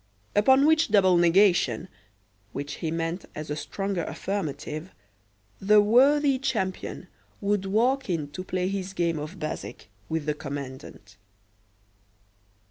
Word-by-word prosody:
Upon 265 +7 +5
which 315 +1 +4
double 190 -3 +5
negation, 175 +1 +3 0.7
which 145 +1 -5
he 160 - -1
meant 165 +2 -3
as 155 -1 -6
a - - -1
stronger 195 +5 -3
affirmative, 155 -3 -4 0.7
the 210 +2 +5
worthy 270 +6 +4
champion 190 -8 -3 0.3
would 200 -1 0
walk 245 +6 +1
in 155 -5 -2
to 185 +5 -7
play 185 -1 -2
his 190 -1 -4
game 170 -4 0
of 155 +6 -7
bezique 155 -8 -6 0.2
with 160 -2 -2
the 150 - 0
commandant. 135 -8 -8
185 Hz, 125 wpm, -26 LUFS, 155-205 Hz, 0.7 s, Upon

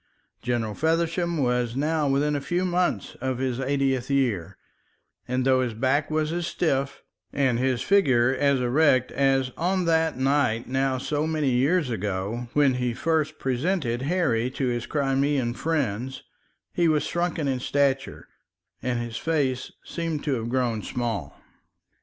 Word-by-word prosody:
General 120 -3 -1
Feversham 165 - 0
was 125 -3 0
now 150 +1 +1
within 145 +2 +1
a 145 - -2
few 175 +6 -1
months 180 0 0
of 130 -1 -1
his 130 -1 -2
eightieth 135 -1 0
year, 125 -11 0 0.7
and 125 +1 -1
though 130 -1 +4
his 120 -3 -2
back 135 +5 +1
was 155 0 0
as 175 -1 -2
stiff 140 -5 -1 0.3
and 130 -4 +1
his 130 -2 0
figure 130 -11 +3
as 140 -1 +2
erect 130 0 +3
as 135 -1 +2
on 180 +2 0
that 160 -2 +2
night 130 -4 +1
now 130 0 0
so 150 +4 -1
many 155 -4 0
years 135 +3 +2
ago 105 +3 -3
when 145 -3 +4
he 125 -2 -1
first 155 +1 0
presented 130 -2 -1
Harry 135 -7 +1
to 130 +1 -3
his 120 -1 -2
Crimean 135 -3 +1
friends, 130 -5 -2 0.5
he 170 - +2
was 155 -2 +2
shrunken 170 -3 -1
in 130 -2 0
stature, 135 0 0 0.5
and 125 -1 -1
his 120 -1 -4
face 135 -5 -1
seemed 165 -3 -3
to 145 - 0
have 115 -2 -2
grown 120 -3 0
small. 115 - -4
135 Hz, 150 wpm, -25 LUFS, 125-155 Hz, 0.7 s, though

